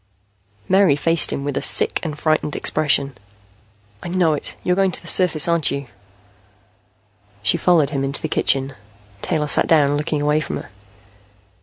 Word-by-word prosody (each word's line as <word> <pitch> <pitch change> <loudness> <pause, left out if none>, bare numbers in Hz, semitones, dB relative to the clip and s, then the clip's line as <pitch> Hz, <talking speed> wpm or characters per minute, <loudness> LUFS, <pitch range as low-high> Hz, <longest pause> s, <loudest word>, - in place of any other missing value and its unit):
Mary 190 -6 +3
faced 165 +2 +2
him 140 - -4
with 145 -1 -4
a - - -2
sick - - +3
and 155 -3 -6
frightened 155 -1 -1
expression. 140 -3 +1 0.9
"I - - -8
know 175 -3 +1
it. 150 - -5
You're 180 - 0
going 195 0 +1
to - - -2
the - - -19
surface. 170 -3 +2
Aren't 170 -3 +1
you?" 140 0 -4 1.6
She - - +1
followed 165 -5 +2
him 135 -2 -2
into 135 +1 -2
the - - -1
kitchen. 135 0 0 0.5
Taylor 155 -3 -1
sat 145 - +2
down, 145 -3 +2
looking 150 0 -3
away 150 +1 +1
from 155 - -5
her. - - -11
150 Hz, 165 wpm, -19 LUFS, 140-170 Hz, 1.6 s, Mary